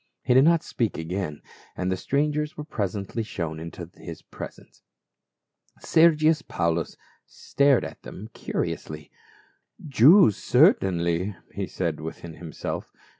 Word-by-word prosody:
He 125 Hz, -, +2 dB
did 130 Hz, +3 st, +6 dB
not 170 Hz, 0 st, +4 dB
speak 115 Hz, -5 st, -2 dB
again, 80 Hz, -2 st, -4 dB, 0.3 s
and 90 Hz, 0 st, -1 dB
the -, -, +1 dB
strangers 150 Hz, +7 st, -1 dB
were 150 Hz, -, -5 dB
presently 105 Hz, -, -3 dB
shown 85 Hz, -7 st, -4 dB
into 85 Hz, +2 st, -7 dB
the 85 Hz, -1 st, -10 dB
presence. -, -, -10 dB, 1.0 s
Sergius 160 Hz, -1 st, +4 dB
Paulus 85 Hz, -, -2 dB, 0.3 s
stared 140 Hz, -2 st, +2 dB
at -, -, -9 dB
them 105 Hz, -, -9 dB
curiously. 75 Hz, -1 st, -4 dB, 0.8 s
"Jews, 140 Hz, -, +6 dB
certainly," 90 Hz, +1 st, +2 dB, 0.2 s
he -, -, -3 dB
said 85 Hz, -4 st, -3 dB
within 80 Hz, +1 st, -7 dB
himself. 80 Hz, -1 st, -6 dB
95 Hz, 120 wpm, -25 LUFS, -, 1.0 s, did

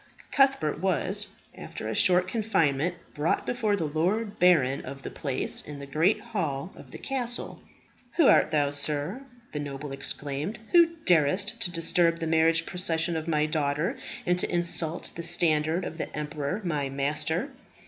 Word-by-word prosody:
Cuthbert 270 Hz, -, +2 dB
was, 190 Hz, +3 st, -1 dB, 0.3 s
after -, -, -7 dB
a -, -, -2 dB
short 180 Hz, 0 st, +4 dB
confinement, 175 Hz, -, 0 dB, 0.2 s
brought 150 Hz, +2 st, 0 dB
before 220 Hz, -4 st, 0 dB
the 170 Hz, -5 st, -2 dB
lord 185 Hz, +8 st, -1 dB
baron 150 Hz, -7 st, +3 dB
of 135 Hz, +1 st, -9 dB
the -, -, -6 dB
place, 135 Hz, -3 st, 0 dB
in 145 Hz, -1 st, -9 dB
the 140 Hz, -, -8 dB
great 160 Hz, +9 st, +2 dB
hall 165 Hz, -4 st, -4 dB
of -, -, -13 dB
the -, -, -9 dB
castle. 245 Hz, -3 st, -1 dB, 0.5 s
"Who 330 Hz, -, +4 dB
art -, -, +5 dB
thou, 145 Hz, -2 st, +1 dB
sir," 145 Hz, -, -1 dB, 0.3 s
the 150 Hz, -, -4 dB
noble 145 Hz, 0 st, -6 dB
exclaimed, 145 Hz, +6 st, -2 dB
"who 335 Hz, -1 st, +5 dB
darest 185 Hz, +7 st, +2 dB
to -, -, +2 dB
disturb 165 Hz, 0 st, +2 dB
the 165 Hz, -, -4 dB
marriage 165 Hz, +1 st, +3 dB
procession 170 Hz, -2 st, 0 dB
of 160 Hz, 0 st, -4 dB
my 150 Hz, -2 st, +2 dB
daughter, 150 Hz, +1 st, -1 dB, 0.3 s
and 180 Hz, 0 st, +1 dB
to -, -, +2 dB
insult 170 Hz, -1 st, 0 dB
the 170 Hz, -, -5 dB
standard 165 Hz, -1 st, +1 dB
of 160 Hz, -, -7 dB
the -, -, -4 dB
emperor 150 Hz, +5 st, -3 dB
my 150 Hz, -6 st, -1 dB
master?" 150 Hz, -, -1 dB
165 Hz, 160 wpm, -27 LUFS, 150-185 Hz, 0.5 s, art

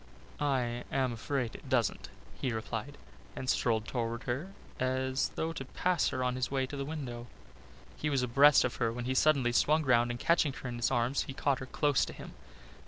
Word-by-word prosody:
"I 125 Hz, -4 st, 0 dB
am 130 Hz, -2 st, +1 dB
afraid 120 Hz, +1 st, -2 dB
it 135 Hz, -, -11 dB
doesn't," 120 Hz, -5 st, 0 dB, 0.3 s
he 130 Hz, -, 0 dB
replied, 110 Hz, -1 st, -4 dB, 0.4 s
and 130 Hz, -, -5 dB
strolled 115 Hz, -4 st, +1 dB
towards 115 Hz, -1 st, -2 dB
her 140 Hz, +10 st, -3 dB, 0.3 s
as 130 Hz, +1 st, 0 dB
though 165 Hz, +1 st, -2 dB
to 135 Hz, -, -5 dB
pass 175 Hz, +5 st, 0 dB
her 130 Hz, -, -2 dB
on 125 Hz, 0 st, 0 dB
his 130 Hz, -1 st, -1 dB
way 135 Hz, -1 st, 0 dB
to 135 Hz, -, -7 dB
the 140 Hz, 0 st, -3 dB
window. 130 Hz, -6 st, -5 dB, 0.7 s
He 150 Hz, -, -1 dB
was 135 Hz, -3 st, +1 dB
abreast 140 Hz, +4 st, +6 dB
of 125 Hz, -, -2 dB
her 115 Hz, -1 st, +1 dB
when 120 Hz, +1 st, -5 dB
he 130 Hz, -, 0 dB
suddenly 135 Hz, -3 st, +3 dB
swung 155 Hz, +6 st, +3 dB
round 120 Hz, -3 st, +3 dB
and 120 Hz, 0 st, -4 dB
catching 160 Hz, -2 st, +2 dB
her 135 Hz, -, -7 dB
in 120 Hz, -, -5 dB
his 120 Hz, -, +1 dB
arms 125 Hz, +1 st, +1 dB
he 135 Hz, -, -5 dB
caught 135 Hz, -2 st, +1 dB
her 130 Hz, -, -7 dB
close 145 Hz, 0 st, +2 dB
to -, -, -8 dB
him. -, -, -10 dB
130 Hz, 205 wpm, -31 LUFS, 120-140 Hz, 0.7 s, abreast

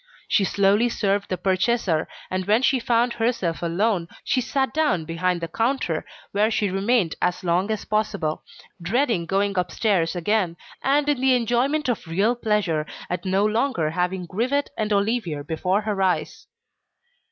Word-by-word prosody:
She 200 Hz, -, +3 dB
slowly 200 Hz, +5 st, +3 dB
served 200 Hz, -2 st, 0 dB
the 185 Hz, -, -1 dB
purchaser, 185 Hz, -2 st, +1 dB, 0.2 s
and 185 Hz, 0 st, -2 dB
when 220 Hz, +5 st, +3 dB
she 265 Hz, -1 st, +3 dB
found 235 Hz, 0 st, +1 dB
herself 225 Hz, -8 st, -1 dB
alone, 175 Hz, +1 st, 0 dB, 0.2 s
she 255 Hz, -, +1 dB
sat 265 Hz, +2 st, -1 dB
down 295 Hz, -, +1 dB
behind 170 Hz, +2 st, -1 dB
the 165 Hz, -, -2 dB
counter 225 Hz, -, -1 dB, 0.2 s
where 210 Hz, +2 st, +2 dB
she 210 Hz, -3 st, 0 dB
remained 195 Hz, -2 st, +1 dB
as 180 Hz, +1 st, 0 dB
long 180 Hz, +3 st, +1 dB
as 215 Hz, -1 st, -2 dB
possible, 200 Hz, -7 st, -1 dB, 0.4 s
dreading 220 Hz, -2 st, 0 dB
going 195 Hz, 0 st, +1 dB
upstairs 180 Hz, -2 st, 0 dB
again, 180 Hz, -1 st, 0 dB, 0.2 s
and 285 Hz, +2 st, +2 dB
in 290 Hz, -4 st, +1 dB
the 260 Hz, -1 st, +4 dB
enjoyment 250 Hz, +6 st, +1 dB
of 235 Hz, -8 st, -2 dB
real 200 Hz, +9 st, +1 dB
pleasure 205 Hz, -10 st, 0 dB, 0.2 s
at 180 Hz, +1 st, -3 dB
no 190 Hz, +2 st, +2 dB
longer 215 Hz, -, 0 dB
having 180 Hz, +2 st, -1 dB
Grivet 250 Hz, -, -1 dB
and 215 Hz, -1 st, -2 dB
Olivier 200 Hz, -7 st, 0 dB
before 180 Hz, +6 st, 0 dB
her 210 Hz, -2 st, -2 dB
eyes. 185 Hz, -1 st, -1 dB
200 Hz, 155 wpm, -23 LUFS, 180-235 Hz, 0.4 s, the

